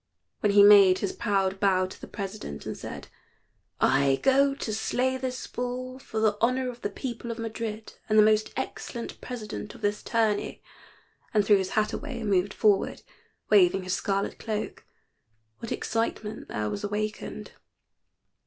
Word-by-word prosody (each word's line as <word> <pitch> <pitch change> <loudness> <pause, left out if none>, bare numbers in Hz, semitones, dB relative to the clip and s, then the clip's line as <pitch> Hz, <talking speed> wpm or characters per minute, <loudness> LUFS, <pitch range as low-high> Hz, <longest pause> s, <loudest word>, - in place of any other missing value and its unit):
When 205 -1 +2
he 200 0 +8
made 200 -2 +8
his 200 - -2
proud 195 -3 0
bow 190 -2 +3
to 185 - -10
the - - -8
president, 195 - -6
and - - -4
said, - - -8 0.7
"I 135 0 +3
go 275 +1 +4
to 220 -5 -4
slay 255 +4 0
this 255 -1 -4
bull 255 +1 -4
for 220 -4 -5
the 215 -1 +2
honor 255 +2 +1
of 240 0 -15
the - - -2
people 235 +2 -6
of 230 - -4
Madrid 225 -1 -5 0.2
and 215 - +3
the 215 - +9
most 215 0 +3
excellent 235 -2 -5
president 215 -3 -6
of 240 - -14
this 205 0 0
tourney," 220 -3 0 0.7
and 210 -1 +4
threw 205 0 +6
his 190 -1 -2
hat 215 0 +2
away 290 -5 -5
and 210 -2 -1
moved 190 +1 +2
forward, 205 -2 +2 0.5
waving 190 -2 +5
his 185 0 -2
scarlet 195 0 -1
cloak, 215 -1 -4 0.8
what 230 - -7
excitement 220 -1 -2
there 105 0 -2
was 200 - -4
awakened. 210 +1 -4
215 Hz, 160 wpm, -27 LUFS, 200-235 Hz, 0.8 s, the